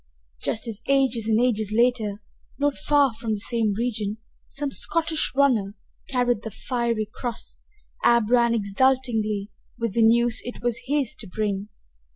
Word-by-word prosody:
Just 225 - -1
as 225 -1 -5
ages 265 -5 +2
and 220 0 +3
ages 220 -4 +1
later, 220 -3 +1 0.3
not 290 0 +1
far 280 +4 +3
from 220 0 -3
the - - -6
same 225 -1 0
region, 215 -3 -2 0.3
some 285 0 -3
Scottish 325 +2 0
runner 235 -8 +2 0.3
carried 245 -4 +1
the 220 - -5
fiery 235 -1 -2
cross, 240 -2 -5 0.4
Ab 235 -2 +4
ran 235 -1 +4
exultingly 215 -1 +1 0.3
with 230 -4 -2
the 230 - +2
news 235 +1 +4
it 245 0 -8
was 235 -1 0
his 280 -3 0
to 215 - -7
bring. 205 +1 -2
235 Hz, 150 wpm, -24 LUFS, 215-250 Hz, 0.4 s, Ab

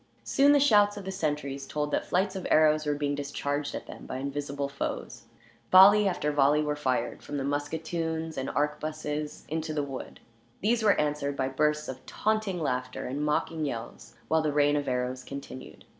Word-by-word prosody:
Soon 280 +1 +4
the 290 - +6
shouts 205 -6 +4
of 200 - -7
the 190 - -3
sentries 145 -6 -3
told 150 +1 -2
that - - -1
flights 190 +2 +1
of 190 - -4
arrows 155 -1 +4
were 145 - +1
being 145 0 -1
discharged 145 0 -3
at - - -6
them, - - -10
by - - -4
invisible 140 +1 -3
foes. 140 0 -5 0.5
Volley 200 +2 +8
after 150 -5 0
volley 145 +1 +3
were 150 0 -1
fired, 130 -5 -1
from 145 - -5
the 135 - -2
musketoons 160 +3 -2
and 135 0 -3
arquebuses, 150 0 -3
into 155 0 -3
the 145 - 0
wood. 135 -2 -7 0.4
These 225 +3 +2
were 210 -2 +4
answered 145 -1 -1
by 130 0 0
bursts 150 +2 0
of 130 - -7
taunting 215 -4 -1
laughter, 125 -4 -2
and 140 +4 -3
mocking 155 +1 0
yells, 115 -3 -6
while 160 0 +3
the 155 -1 0
rain 145 0 +3
of 145 -1 -1
arrows 125 0 -2
continued. 65 - -9
150 Hz, 185 wpm, -28 LUFS, 140-160 Hz, 0.5 s, Volley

